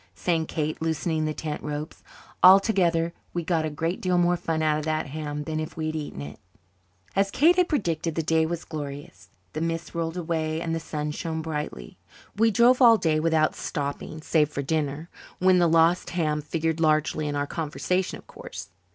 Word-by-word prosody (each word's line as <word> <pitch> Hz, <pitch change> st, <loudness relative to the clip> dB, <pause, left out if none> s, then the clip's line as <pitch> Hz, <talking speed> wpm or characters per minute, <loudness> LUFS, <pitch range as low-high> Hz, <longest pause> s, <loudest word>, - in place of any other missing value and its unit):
sang 165 Hz, -3 st, 0 dB
Kate, 155 Hz, 0 st, -3 dB
loosening 160 Hz, 0 st, -1 dB
the 155 Hz, -, -1 dB
tent 150 Hz, -1 st, -4 dB
ropes. 150 Hz, +1 st, -5 dB, 0.4 s
Altogether, 180 Hz, -3 st, +5 dB, 0.2 s
we 175 Hz, -, -1 dB
got 160 Hz, -1 st, 0 dB
a -, -, -1 dB
great 165 Hz, +4 st, -3 dB
deal 180 Hz, -1 st, +1 dB
more 175 Hz, 0 st, +3 dB
fun 160 Hz, -2 st, -2 dB
out 155 Hz, -1 st, +2 dB
of 150 Hz, -, -5 dB
that 155 Hz, 0 st, 0 dB
ham 150 Hz, 0 st, -5 dB
than 155 Hz, 0 st, -3 dB
if 155 Hz, +1 st, -6 dB
we 160 Hz, -, -2 dB
had 155 Hz, 0 st, -2 dB
eaten 145 Hz, -, -5 dB
it. 70 Hz, +1 st, -9 dB, 0.8 s
As 195 Hz, 0 st, +2 dB
Kate 315 Hz, -, +4 dB
had 360 Hz, -1 st, +2 dB
predicted, 165 Hz, -, -1 dB
the 165 Hz, -, 0 dB
day 160 Hz, 0 st, +2 dB
was 170 Hz, 0 st, -4 dB
glorious. 140 Hz, -, -7 dB, 0.2 s
The 155 Hz, -, -3 dB
mists 165 Hz, 0 st, -3 dB
rolled 165 Hz, 0 st, -3 dB
away 160 Hz, -2 st, -1 dB
and 165 Hz, -1 st, -2 dB
the 165 Hz, -, -1 dB
sun 150 Hz, -2 st, -4 dB
shone 160 Hz, +1 st, -4 dB
brightly. 150 Hz, -, -5 dB, 0.4 s
We 225 Hz, +2 st, +4 dB
drove 240 Hz, +4 st, +4 dB
all 230 Hz, -2 st, +8 dB
day 160 Hz, -5 st, +1 dB
without 155 Hz, -1 st, +2 dB
stopping, 145 Hz, +2 st, -4 dB
save 150 Hz, -3 st, +2 dB
for 140 Hz, -2 st, -4 dB
dinner 150 Hz, +1 st, -2 dB, 0.3 s
when 185 Hz, 0 st, +4 dB
the 170 Hz, -1 st, +4 dB
lost 165 Hz, +2 st, +3 dB
ham 155 Hz, -4 st, 0 dB
figured 160 Hz, +1 st, -2 dB
largely 155 Hz, -1 st, +1 dB
in 145 Hz, -, -2 dB
our 145 Hz, 0 st, 0 dB
conversation 170 Hz, +4 st, -2 dB
of -, -, -17 dB
course. 100 Hz, -, -9 dB
160 Hz, 195 wpm, -26 LUFS, 155-170 Hz, 0.8 s, all